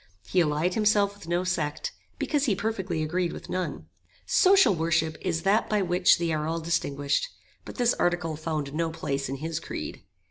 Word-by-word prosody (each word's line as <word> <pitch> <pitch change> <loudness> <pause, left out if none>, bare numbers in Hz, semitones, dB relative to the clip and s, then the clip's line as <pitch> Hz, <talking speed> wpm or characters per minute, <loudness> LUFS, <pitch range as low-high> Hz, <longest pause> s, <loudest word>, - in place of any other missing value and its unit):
He 185 - +1
allied 160 +2 +1
himself 210 -1 +3
with 200 -5 -14
no 175 +1 0
sect, 160 -5 -2 0.3
because 290 -2 0
he 215 -7 +2
perfectly 190 -6 -2
agreed 175 +2 -1
with - - -9
none. 185 -1 -3 0.4
Social 380 - +5
worship 160 -1 +1
is 170 -3 -1
that 200 +3 +2
by 210 -2 +2
which 180 0 +4
they 170 -1 -1
are 155 0 -1
all 165 +1 -1
distinguished; 150 - -1 0.4
but - - -9
this 240 -2 +3
article 175 -2 0
found 155 -3 -3
no 165 +1 0
place 140 -4 -3
in 135 - -2
his 160 +3 -3
creed. - - -6
170 Hz, 180 wpm, -27 LUFS, 155-195 Hz, 0.4 s, Social